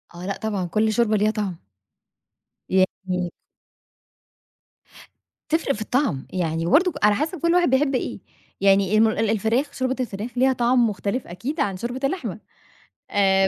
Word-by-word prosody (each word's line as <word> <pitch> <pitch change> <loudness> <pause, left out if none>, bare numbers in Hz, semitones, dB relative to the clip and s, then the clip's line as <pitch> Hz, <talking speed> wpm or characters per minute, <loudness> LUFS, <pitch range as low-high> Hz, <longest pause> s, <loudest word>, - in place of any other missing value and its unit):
آه 175 +1 -7
لأ 195 0 -3
طبعًا، 205 -4 -2
كل 215 +4 +1
شوربة 220 -2 +2
ليها 210 +1 +2
طعم. 195 - -4 1.0
يعني 185 -1 0 2.2
تفرق 320 -2 +1
في 215 - -8
الطعم، 215 - -1
يعني 165 -3 -1
برضه 345 - +4
على 210 0 +5
حسب 310 - -2
كل 335 +2 +2
واحد 355 -3 +4
بيحب 270 +1 +2
إيه، - - -3 0.4
يعني 195 +1 +4
الم 220 +1 +6
ال 220 0 0
الفراخ 225 +7 0
شوربة 260 -1 -1
الفراخ 225 -1 -4
ليها 260 +1 +4
طعم 240 -1 +3
مختلف 205 +5 -3
أكيد 250 - -5
عن 200 -9 0
شوربة 245 +6 -4
اللحمة، 270 - -2 0.7
آآ 195 -1 +3
220 Hz, 145 wpm, -23 LUFS, 195-260 Hz, 2.2 s, الم